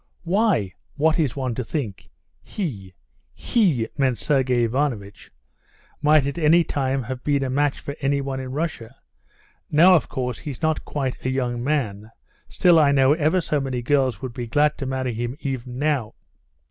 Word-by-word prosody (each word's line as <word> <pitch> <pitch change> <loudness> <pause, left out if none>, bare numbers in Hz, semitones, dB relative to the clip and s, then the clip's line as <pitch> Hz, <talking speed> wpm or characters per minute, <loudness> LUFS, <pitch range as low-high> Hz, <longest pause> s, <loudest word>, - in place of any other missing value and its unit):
"Why, 180 - +1 0.2
what 155 +2 +2
is 140 -7 0
one 130 -3 -2
to 125 - -3
think? 115 -5 -5 0.3
He" 100 - -6 0.4
(he 165 - +1
meant 130 -4 +1
Sergey 125 +3 +1
Ivanovitch) 115 -5 -2 0.7
"might 150 -1 +4
at 140 +4 -3
any 165 +2 +5
time 135 -3 -1
have 125 +1 -6
been 140 -2 +1
a 130 - -2
match 145 +1 +1
for 140 - -6
anyone 135 -1 -1
in 130 -1 -6
Russia; 135 -5 -4 0.7
now, 170 +5 +6
of 165 - +2
course, 125 -2 -3
he's 145 -2 -7
not 160 -1 0
quite 135 -3 -3
a 130 - -1
young 125 -2 -2
man, 110 -8 -2 0.4
still 175 -2 +4
I 145 -2 +4
know 135 0 +4
ever 160 +4 +1
so 150 -3 -1
many 130 -3 -3
girls 130 -5 +1
would 130 -2 -5
be 120 -2 -5
glad 150 +5 +2
to 135 - -3
marry 130 -2 -2
him 120 +4 -4
even 125 -2 -5
now.... 140 -6 -1
135 Hz, 170 wpm, -23 LUFS, 125-150 Hz, 0.7 s, now